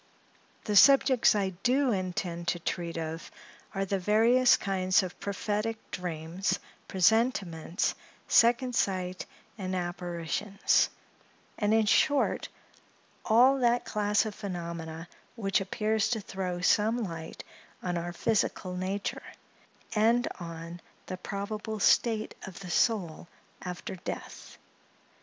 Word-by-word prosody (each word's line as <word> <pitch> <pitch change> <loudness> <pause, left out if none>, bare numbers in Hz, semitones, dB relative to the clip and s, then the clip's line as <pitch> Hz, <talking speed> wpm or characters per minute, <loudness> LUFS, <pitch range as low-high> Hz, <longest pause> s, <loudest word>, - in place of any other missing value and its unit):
The 210 - -2
subjects 265 0 +6
I 200 -2 +1
do 260 +3 +2
intend 180 -3 -3
to 175 - 0
treat 170 0 -3
of 165 0 -5 0.5
are 195 0 0
the 195 0 -1
various 235 +6 +4
kinds 190 -2 +1
of 180 -1 -7
prophetic 210 +3 -2
dreams, 175 +1 -2 0.3
presentiments, 190 -4 +1 0.3
second 245 +2 +4
sight, 185 -3 -1 0.3
and 185 -1 -3
apparitions; 175 +2 0 0.7
and, 210 -1 +1
in 220 0 +4
short, 285 +6 +2 0.8
all 255 +5 +5
that 240 -1 +2
class 210 0 +1
of 215 - -4
phenomena 170 -4 -6 0.3
which 195 -4 0
appears 215 +2 0
to 230 - 0
throw 185 -3 -4
some 220 +5 +2
light 165 -4 -7 0.4
on 180 -1 -1
our 170 0 -3
physical 190 -2 -1
nature, 190 +2 -3 0.7
and 230 +3 +3
on 170 0 -8 0.2
the 185 - -5
probable 210 +3 -5
state 220 +1 +2
of 190 0 -10
the 180 -2 -7
soul 180 -7 0 0.3
after 180 +1 -6
death. - - -8
195 Hz, 115 wpm, -29 LUFS, 175-220 Hz, 0.8 s, subjects